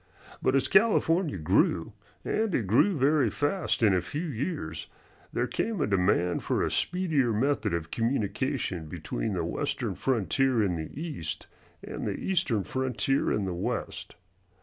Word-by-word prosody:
But 130 Hz, -, +2 dB
as 135 Hz, -, +2 dB
California 190 Hz, -, +3 dB
grew 75 Hz, -, +1 dB, 0.3 s
and 220 Hz, -3 st, 0 dB
it 115 Hz, -, 0 dB
grew 135 Hz, -, +3 dB
very 140 Hz, -2 st, +3 dB
fast 145 Hz, -, -1 dB
in 105 Hz, -3 st, +5 dB
a 90 Hz, -, +2 dB
few 145 Hz, -, -4 dB
years 140 Hz, -, -4 dB, 0.4 s
there -, -, 0 dB
came 220 Hz, -4 st, -2 dB
a 145 Hz, -, +2 dB
demand 90 Hz, -2 st, +2 dB
for -, -, 0 dB
a -, -, 0 dB
speedier 160 Hz, -9 st, +1 dB
method 125 Hz, -4 st, +1 dB
of 85 Hz, -1 st, -5 dB
communication 115 Hz, -, -1 dB
between -, -, -3 dB
the -, -, -1 dB
Western -, -, -2 dB
frontier 120 Hz, -, +1 dB
in 95 Hz, -3 st, 0 dB
the 80 Hz, -1 st, -5 dB
East 145 Hz, -, -5 dB, 0.4 s
and -, -, -5 dB
the -, -, -1 dB
Eastern 165 Hz, -, 0 dB
frontier 130 Hz, +1 st, 0 dB
in 105 Hz, -, 0 dB
the 95 Hz, -, -2 dB
West. 85 Hz, -, -4 dB
130 Hz, 150 wpm, -28 LUFS, 95-150 Hz, 0.4 s, in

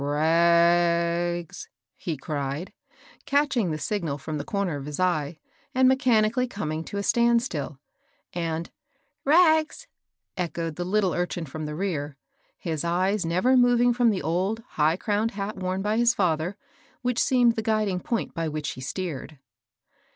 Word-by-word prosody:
^^ -, -, -2 dB
Rags! 170 Hz, +2 st, +2 dB
" 115 Hz, -2 st, -62 dB
he 165 Hz, -4 st, -4 dB
cried, 140 Hz, +4 st, -4 dB, 0.5 s
catching 280 Hz, -8 st, +2 dB
the 155 Hz, -, -2 dB
signal 165 Hz, -4 st, -2 dB
from 155 Hz, +1 st, -5 dB
the -, -, -3 dB
comer 200 Hz, -4 st, -2 dB
of 140 Hz, 0 st, -7 dB
his 150 Hz, +2 st, -5 dB
eye, 165 Hz, -4 st, 0 dB, 0.4 s
and 260 Hz, 0 st, +5 dB
mechanically 250 Hz, -2 st, +3 dB
coming 160 Hz, -8 st, -4 dB
to 200 Hz, -, -6 dB
a 200 Hz, -, -2 dB
stand 235 Hz, +2 st, +3 dB
still, 150 Hz, -, -5 dB, 0.5 s
and 165 Hz, -1 st, -3 dB, 0.5 s
"Rags!" 315 Hz, 0 st, +4 dB, 0.5 s
echoed 170 Hz, -3 st, -3 dB
the 175 Hz, -, -3 dB
little 195 Hz, 0 st, +1 dB
urchin 175 Hz, -1 st, -2 dB
from 155 Hz, +2 st, -6 dB
the 150 Hz, -, -5 dB
rear, 150 Hz, -6 st, -3 dB, 0.4 s
his 160 Hz, -3 st, -3 dB
eyes 185 Hz, +2 st, 0 dB
never 185 Hz, +10 st, +3 dB
moving 245 Hz, -1 st, +4 dB
from 240 Hz, -1 st, +3 dB
the 195 Hz, -8 st, -1 dB
old, 190 Hz, +8 st, -1 dB
high 155 Hz, +2 st, +1 dB
crowned 215 Hz, +2 st, 0 dB
hat 200 Hz, +1 st, -3 dB
worn 185 Hz, +1 st, -2 dB
by 210 Hz, +1 st, 0 dB
his 240 Hz, 0 st, +4 dB
fether, 175 Hz, 0 st, 0 dB, 0.5 s
which 250 Hz, -1 st, 0 dB
seemed 245 Hz, -3 st, +3 dB
the 220 Hz, -, -1 dB
guiding 215 Hz, -4 st, 0 dB
point 230 Hz, +4 st, -3 dB
by 165 Hz, -1 st, -2 dB
which 150 Hz, -2 st, -3 dB
he 130 Hz, -, -9 dB
steered. 155 Hz, 0 st, -5 dB
180 Hz, 160 wpm, -26 LUFS, 160-220 Hz, 0.5 s, and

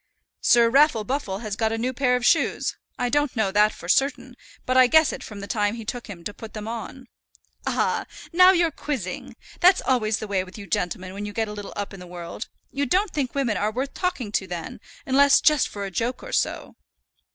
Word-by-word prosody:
"Sir 235 Hz, -1 st, +5 dB
Raffle 270 Hz, -2 st, +4 dB
Buffle 210 Hz, -5 st, -3 dB
has 210 Hz, -2 st, -3 dB
got 220 Hz, +1 st, 0 dB
a 225 Hz, -, -1 dB
new 250 Hz, +3 st, -1 dB
pair 250 Hz, -1 st, +2 dB
of 250 Hz, -1 st, -1 dB
shoes. 330 Hz, -, +2 dB, 0.2 s
I 245 Hz, -, 0 dB
don't 290 Hz, +1 st, 0 dB
know 215 Hz, -4 st, +1 dB
that 210 Hz, +1 st, +4 dB
for 175 Hz, -, -11 dB
certain, 265 Hz, +3 st, +1 dB, 0.3 s
but 255 Hz, -, 0 dB
I 255 Hz, -1 st, +7 dB
guess 315 Hz, +2 st, +5 dB
it -, -, -7 dB
from 205 Hz, -2 st, -8 dB
the 200 Hz, -, -7 dB
time 205 Hz, 0 st, 0 dB
it 225 Hz, -2 st, -9 dB
took 245 Hz, -1 st, -5 dB
him 185 Hz, -6 st, -9 dB
to 205 Hz, -, -5 dB
put 225 Hz, +1 st, -10 dB
them 215 Hz, 0 st, -6 dB
on." 235 Hz, +3 st, -6 dB, 0.6 s
"Ah! -, -, 0 dB, 0.3 s
now 365 Hz, +2 st, +8 dB
you're 340 Hz, -3 st, +2 dB
quizzing. 260 Hz, -, -5 dB, 0.2 s
That's 370 Hz, +1 st, +6 dB
always 225 Hz, -5 st, +1 dB
the 215 Hz, -, -6 dB
way 195 Hz, -2 st, 0 dB
with 185 Hz, +2 st, -12 dB
you 205 Hz, -, -8 dB
gentlemen 185 Hz, 0 st, -2 dB
when 205 Hz, +1 st, -5 dB
you 205 Hz, -, -7 dB
get 225 Hz, +1 st, -1 dB
a 210 Hz, -, -6 dB
little 205 Hz, -1 st, -7 dB
up 205 Hz, 0 st, -4 dB
in 195 Hz, -, -9 dB
the 180 Hz, -, -10 dB
world. 175 Hz, +4 st, -7 dB, 0.2 s
You 280 Hz, 0 st, -1 dB
don't 375 Hz, +7 st, +2 dB
think 275 Hz, -4 st, -2 dB
women 255 Hz, -6 st, 0 dB
are 210 Hz, -, +1 dB
worth 260 Hz, +5 st, -3 dB
talking 340 Hz, -, -2 dB
to 190 Hz, -2 st, -1 dB
then, 175 Hz, +1 st, -6 dB, 0.3 s
unless 280 Hz, +1 st, +5 dB
just 300 Hz, -3 st, +3 dB
for 200 Hz, -1 st, -6 dB
a 195 Hz, -, -6 dB
joke 240 Hz, +7 st, -2 dB
or -, -, -8 dB
so." -, -, -1 dB
230 Hz, 230 wpm, -24 LUFS, 205-275 Hz, 0.6 s, now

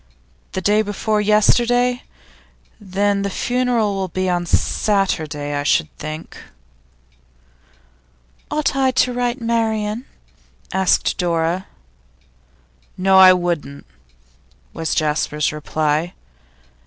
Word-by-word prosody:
The 190 Hz, -, -2 dB
day 210 Hz, +3 st, +3 dB
before 210 Hz, +1 st, -1 dB
yesterday? 240 Hz, +4 st, +2 dB, 0.8 s
Then 200 Hz, 0 st, 0 dB
the 200 Hz, -, -1 dB
funeral 245 Hz, -1 st, 0 dB
will 195 Hz, -1 st, -2 dB
be 185 Hz, +1 st, -2 dB
on 175 Hz, -1 st, -1 dB
Saturday, 160 Hz, -9 st, 0 dB
I 145 Hz, -, -1 dB
should 155 Hz, +2 st, 0 dB
think.' 155 Hz, +1 st, -7 dB, 2.1 s
'Ought 300 Hz, -2 st, -1 dB
I 265 Hz, -1 st, +2 dB
to 255 Hz, -1 st, +1 dB
write 245 Hz, 0 st, -1 dB
to 240 Hz, -, -11 dB
Marian?' 225 Hz, 0 st, -1 dB, 0.7 s
asked 190 Hz, +1 st, +1 dB
Dora. 170 Hz, +1 st, -1 dB, 1.3 s
'No; 190 Hz, +1 st, +4 dB
I 185 Hz, -1 st, +9 dB
wouldn't,' 170 Hz, -6 st, -3 dB, 0.9 s
was 160 Hz, -2 st, -2 dB
Jasper's 150 Hz, -1 st, 0 dB
reply. 155 Hz, +2 st, -2 dB
195 Hz, 100 wpm, -19 LUFS, 165-225 Hz, 2.1 s, I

